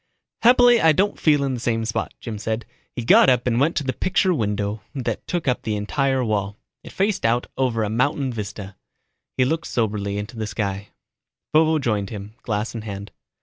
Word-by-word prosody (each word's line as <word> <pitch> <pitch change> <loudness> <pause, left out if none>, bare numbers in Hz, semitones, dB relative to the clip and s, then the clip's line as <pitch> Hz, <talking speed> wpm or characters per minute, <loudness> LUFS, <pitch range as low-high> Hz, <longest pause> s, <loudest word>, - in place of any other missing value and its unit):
"Happily, 245 0 +6
I 160 -1 +6
don't 200 +6 +1
feel 145 -3 +3
in 135 -1 -1
the 125 - -3
same 115 -1 -1
spot," 110 0 -2
Jim 110 -4 -6
said. 110 +2 -3 0.3
He 120 - -4
got - - +7
up 125 -2 +2
and 120 -1 +1
went 150 +5 +2
to 145 - 0
the 130 -1 -1
picture 185 +5 +1
window 105 -4 -2
that 130 -3 -3
took 175 -4 -2
up 125 - +1
one 110 - 0
entire 130 +5 0
wall. 105 -2 -1 0.3
It - - -10
faced 200 +1 0
out 115 +2 +2
over 120 -4 0
a 105 - -1
mountain 130 +2 0
vista. 100 -2 -6 0.6
He 130 - +4
looked 160 +5 -1
soberly 100 -3 -1
into 105 +3 -6
the 110 -1 -3
sky. 100 -1 -3 0.7
Vovo 160 0 +4
joined 105 -8 -1
him, 105 -1 -8
glass 105 0 -2
in 115 - -5
hand. 100 -1 -7
115 Hz, 195 wpm, -22 LUFS, 105-140 Hz, 0.7 s, got